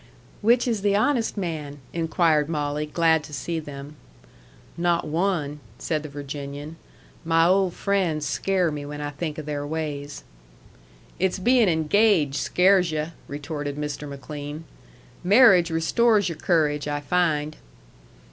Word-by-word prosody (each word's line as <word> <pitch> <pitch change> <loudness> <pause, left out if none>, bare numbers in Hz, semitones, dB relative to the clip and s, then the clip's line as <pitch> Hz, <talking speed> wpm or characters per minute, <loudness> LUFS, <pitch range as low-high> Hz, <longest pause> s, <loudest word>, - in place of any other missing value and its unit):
"Which 235 +4 +3
is 225 -4 0
the 200 0 +2
honest 230 +1 +1
man?" 155 -6 -4 0.2
inquired 165 -2 +1
Molly, 150 -1 -2
glad 160 0 +2
to 150 - -12
see 165 +4 -3
them. 145 -1 -9 0.8
"Not 170 0 +1
one!" 155 -3 -1 0.2
said 155 -2 -2
the 155 - -8
Virginian. 145 +2 -7 0.5
"My 165 0 +3
old 185 0 +2
friends 180 -7 0
scare 185 +3 0
me 145 -1 -5
when 145 +1 -7
I 145 0 -4
think 150 +1 -5
of 155 - -6
their 145 -1 -3
ways." 145 -2 -5 1.0
"It's 190 0 +1
bein' 235 +2 +3
engaged 160 -2 +2
scares 185 -1 +3
yu'," 155 +1 -2 0.2
retorted 145 0 -5
Mr. 150 0 -4
McLean. 145 +3 -7 0.6
"Marriage 195 -3 +6
restores 200 +5 +2
your 165 - -6
courage, 150 -5 +1
I 145 0 -1
find." 155 -1 0
160 Hz, 135 wpm, -24 LUFS, 145-180 Hz, 1.0 s, Marriage